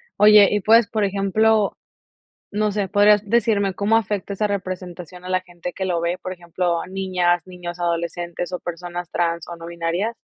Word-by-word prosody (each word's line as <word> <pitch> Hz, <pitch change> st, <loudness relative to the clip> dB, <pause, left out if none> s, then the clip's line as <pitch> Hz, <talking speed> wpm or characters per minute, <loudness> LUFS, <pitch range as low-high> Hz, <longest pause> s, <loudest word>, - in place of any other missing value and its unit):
Oye, 210 Hz, -1 st, +7 dB
y 210 Hz, -1 st, +1 dB
puedes 225 Hz, +1 st, +5 dB
por 215 Hz, -2 st, -1 dB
ejemplo, 200 Hz, +2 st, +2 dB, 0.7 s
no 210 Hz, 0 st, 0 dB
sé, 200 Hz, -2 st, -1 dB
¿podrías 205 Hz, +1 st, +5 dB
decirme 210 Hz, -4 st, +2 dB
cómo 210 Hz, +2 st, +2 dB
afecta 205 Hz, -2 st, -1 dB
esa 210 Hz, +2 st, 0 dB
representación 180 Hz, -2 st, -6 dB
a 185 Hz, -, -7 dB
la 185 Hz, 0 st, +2 dB
gente 175 Hz, -1 st, -8 dB
que 190 Hz, +1 st, -4 dB
lo 175 Hz, -2 st, -1 dB
ve, 170 Hz, +2 st, -1 dB
por 185 Hz, -, -5 dB
ejemplo, 175 Hz, -1 st, -2 dB
a -, -, -8 dB
niñas, 185 Hz, -2 st, 0 dB
niños, 175 Hz, -1 st, -8 dB
adolescentes, 170 Hz, +1 st, -3 dB
o 180 Hz, -, -3 dB
personas 175 Hz, 0 st, -6 dB
trans 170 Hz, -1 st, -1 dB
o 175 Hz, -, -7 dB
no 165 Hz, 0 st, -10 dB
binarias? 170 Hz, +6 st, -2 dB
185 Hz, 180 wpm, -22 LUFS, 175-205 Hz, 0.7 s, Oye